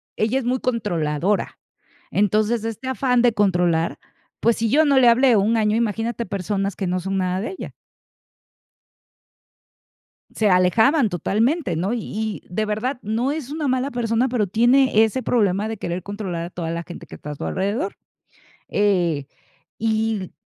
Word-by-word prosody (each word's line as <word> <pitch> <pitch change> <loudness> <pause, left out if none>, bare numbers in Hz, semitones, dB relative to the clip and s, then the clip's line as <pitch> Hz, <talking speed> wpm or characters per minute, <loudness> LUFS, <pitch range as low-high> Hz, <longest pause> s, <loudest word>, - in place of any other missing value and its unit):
ella 225 +5 +1
es 265 - -2
muy 255 +1 0
controladora. 190 -6 -1 0.5
Entonces, 215 +3 +1
este 225 +3 -5
afán 250 -1 +1
de 240 -2 +4
controlar 175 -5 +1 0.4
p 230 - +2
ues, 235 - +2
si 225 0 0
yo 310 +6 +4
no 275 -2 +4
le 245 - +6
hablé 245 +1 +5
un 220 +4 +2
año, 215 -1 +2
imagínate 230 +1 -1
personas 195 0 -2
que 195 - -3
no 180 +1 0
son 195 +2 -3
nada 185 0 -1
de 225 - -4
ella. - - -7 2.6
Se 215 - +2
alejaban 220 - +4
totalmente, 215 - 0
¿no? 190 +7 -1
Y 220 - -4
de 215 +4 -1
verdad, 220 +6 -2
no 225 +6 -1
es 290 -3 -4
una 300 -2 -2
mala 260 +2 0
persona, 235 +1 0
pero 230 -5 0
tiene 240 +2 +4
ese 240 +4 -2
problema 210 -3 +1
de 225 - -4
querer 175 -2 -4
controlar 190 -5 -4
a - - -10
toda 170 -2 -4
la 170 0 -3
gente 175 0 -10
que - - -11
está 150 - -8
a - - -4
su - - -6
alrededor, 210 - -2 0.7
eh, 175 -8 +1 0.5
y 220 0 0
l 185 - -8
215 Hz, 165 wpm, -22 LUFS, 190-240 Hz, 2.6 s, le